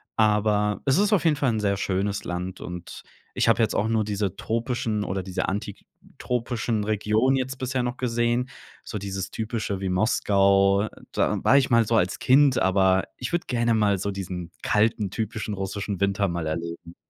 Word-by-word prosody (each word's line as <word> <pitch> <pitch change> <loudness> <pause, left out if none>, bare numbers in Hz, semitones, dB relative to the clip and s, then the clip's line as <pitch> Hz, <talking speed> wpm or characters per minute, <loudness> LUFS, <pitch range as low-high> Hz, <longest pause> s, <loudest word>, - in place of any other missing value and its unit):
aber 105 -1 +2
es 135 -1 +3
ist 205 +1 +2
auf 185 -5 +2
jeden 160 -2 +4
Fall 140 -3 +1
'n 110 - -1
sehr 100 -1 +1
schönes 100 +1 -1
Land 90 +1 -5
und 90 0 -8 0.3
ich - - +1
habe 115 +1 +4
jetzt 110 - +1
auch 105 - +1
nur 110 -1 +1
diese 100 -2 -2
tropischen 115 -2 -2
oder 95 -1 -2
diese 95 -1 -3
antitropischen 115 +3 -4
Regionen 110 +5 +1
jetzt 130 +1 -3
bisher 130 0 -2
noch 125 0 -2
gesehen. 120 +1 0 0.3
So 105 - -5
dieses 95 -2 -4
Typische 110 -3 -3
wie 95 - -2
Moskau, 100 0 +3 0.3
da - - +1
war 140 - +5
ich 135 -1 +2
mal 115 -2 +4
so 115 - +1
als 90 -4 +1
Kind, 135 0 +4
aber 95 -1 +3
ich 125 0 -5
würde 175 0 0
gerne 120 -2 +1
mal 105 -2 +2
so 100 +2 -2
diesen 90 -3 -6
kalten, 105 -1 +1
typischen 110 -1 -3
russischen 100 0 -4
Winter 100 0 +1
mal 85 -3 -3
erleben. 85 +1 -5
105 Hz, 180 wpm, -25 LUFS, 95-120 Hz, 0.3 s, war